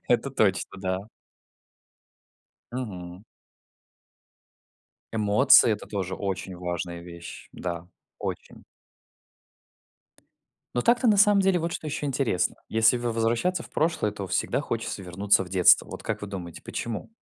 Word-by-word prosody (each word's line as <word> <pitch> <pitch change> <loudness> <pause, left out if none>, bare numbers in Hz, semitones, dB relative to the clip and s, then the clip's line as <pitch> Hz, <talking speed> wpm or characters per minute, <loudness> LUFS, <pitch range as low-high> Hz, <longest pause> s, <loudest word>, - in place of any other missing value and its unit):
Это 125 +3 +2
точно, 105 -7 +1
да. 95 +2 -3 1.6
Мгм. 95 -6 -6 1.9
Эмоции- 110 +3 +6
это 105 - -5
тоже 95 -3 -3
очень 95 -1 -4
важная 85 -1 -4
вещь, 85 0 -10
да, 85 -1 -5 0.3
очень. - - -6 2.1
Но 120 - +1
так-то, 245 +1 +3
на 215 -3 +5
самом 205 0 +6
деле, 190 -3 +3
вот 170 +1 -2
что 160 - -5
еще 150 0 -3
интересно. 135 -9 0
Если 115 +2 +4
в 120 - -6
возвращаться 120 +9 0
в - - -14
прошлое, 160 -9 0
то 100 -1 -6
всегда - - 0
хочется - - -4
вернуться 95 +2 +2
в 90 - -12
детство. 90 -2 +5
Вот - - -8
как - - -3
вы 105 - -5
думаете, 90 -4 -7
почему? 115 - -5
105 Hz, 130 wpm, -26 LUFS, 95-135 Hz, 2.1 s, Эмоции